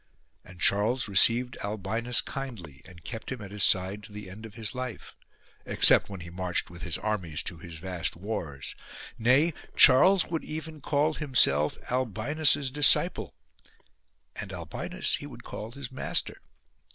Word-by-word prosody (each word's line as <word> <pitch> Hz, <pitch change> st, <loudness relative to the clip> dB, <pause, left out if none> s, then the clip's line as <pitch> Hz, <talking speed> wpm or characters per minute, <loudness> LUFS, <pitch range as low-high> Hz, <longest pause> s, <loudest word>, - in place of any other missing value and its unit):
And 90 Hz, -1 st, -15 dB
Charles 105 Hz, +9 st, +2 dB
received 115 Hz, +5 st, +4 dB
Albinus 110 Hz, +4 st, -1 dB
kindly 105 Hz, -, -8 dB
and 85 Hz, -2 st, -15 dB
kept 110 Hz, +9 st, -7 dB
him 130 Hz, -, -5 dB
at 100 Hz, -2 st, -10 dB
his 105 Hz, -1 st, 0 dB
side 95 Hz, +2 st, +2 dB
to 105 Hz, -, -14 dB
the 105 Hz, -2 st, -9 dB
end 110 Hz, +4 st, -10 dB
of 110 Hz, -, -17 dB
his 110 Hz, -2 st, -4 dB
life, 125 Hz, -2 st, -7 dB, 0.5 s
except -, -, +4 dB
when 100 Hz, -3 st, -8 dB
he 85 Hz, 0 st, -9 dB
marched 90 Hz, -1 st, -3 dB
with 85 Hz, 0 st, -11 dB
his 85 Hz, -2 st, -3 dB
armies 95 Hz, -8 st, -3 dB
to 85 Hz, -, -6 dB
his 85 Hz, 0 st, -10 dB
vast 90 Hz, 0 st, -3 dB
wars: 85 Hz, -7 st, -6 dB, 0.5 s
nay, 135 Hz, +8 st, +3 dB, 0.2 s
Charles 175 Hz, +8 st, +7 dB
would 165 Hz, -2 st, -4 dB
even 155 Hz, -1 st, -7 dB
call 150 Hz, +3 st, +1 dB
himself 125 Hz, -, +2 dB
Albinus's 130 Hz, +4 st, +1 dB
disciple; 145 Hz, 0 st, +3 dB, 1.0 s
and -, -, -7 dB
Albinus -, -, -3 dB
he -, -, -9 dB
would -, -, -12 dB
call 110 Hz, -, -7 dB
his 135 Hz, 0 st, -9 dB
master. 130 Hz, -, -2 dB
110 Hz, 150 wpm, -27 LUFS, 90-130 Hz, 1.0 s, Charles